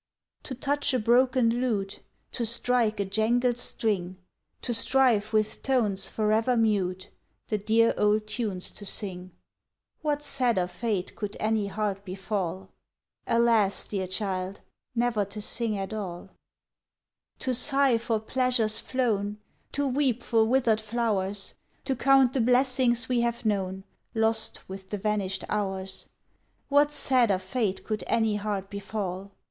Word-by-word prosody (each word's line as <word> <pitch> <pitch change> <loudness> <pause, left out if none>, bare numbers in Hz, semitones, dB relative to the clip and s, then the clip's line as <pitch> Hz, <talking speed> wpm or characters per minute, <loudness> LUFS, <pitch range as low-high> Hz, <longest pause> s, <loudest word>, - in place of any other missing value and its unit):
To 260 - -5
touch 285 +1 0
a - - +2
broken 240 +1 +3
lute, 205 -6 -1 0.3
To 240 - -3
strike 235 -1 +2
a 200 - +1
jangled 235 +5 +1
string, 190 -7 -1 0.5
To 245 - -1
strive 230 -3 +3
with 215 -1 0
tones 220 -8 +1
forever 220 +3 +1
mute 190 -5 0 0.4
The 215 - 0
dear 225 +3 +3
old 210 +1 +2
tunes 210 -4 -1
to - - -4
sing 185 -2 -2 0.7
What 295 -2 -1
sadder 245 -10 +1
fate 190 +1 -3
could 210 -1 -5
any 215 -1 0
heart 200 -1 -2
befall? 190 -1 -4 0.6
Alas! 230 -4 +3
dear 190 -3 -3
child, 190 0 -3 0.3
never 235 -3 +1
to 200 +2 -6
sing 220 0 -1
at 195 +2 -4
all. 190 -3 -6 1.1
To 255 - -1
sigh 270 -1 +3
for 225 -1 -1
pleasures 245 -1 +1
flown. 210 -5 -1 0.4
To 285 - 0
weep 260 -3 0
for 225 -2 +3
withered 230 -2 +2
flowers, 205 -3 -1 0.3
To 265 - 0
count 270 0 +4
the 265 - +1
blessings 250 -1 +2
we 245 -2 +1
have 235 0 -2
known, 190 -2 -1 0.3
Lost 220 0 0
with 190 0 -9
the 205 - -3
vanished 200 -2 -1
hours 190 -2 -3 0.6
What 290 +1 +4
sadder 255 -8 +2
fate 190 +1 -2
could 215 -4 -3
any 225 -2 +1
heart 200 -1 -3
befall? 200 -2 -4
220 Hz, 135 wpm, -27 LUFS, 200-245 Hz, 1.1 s, count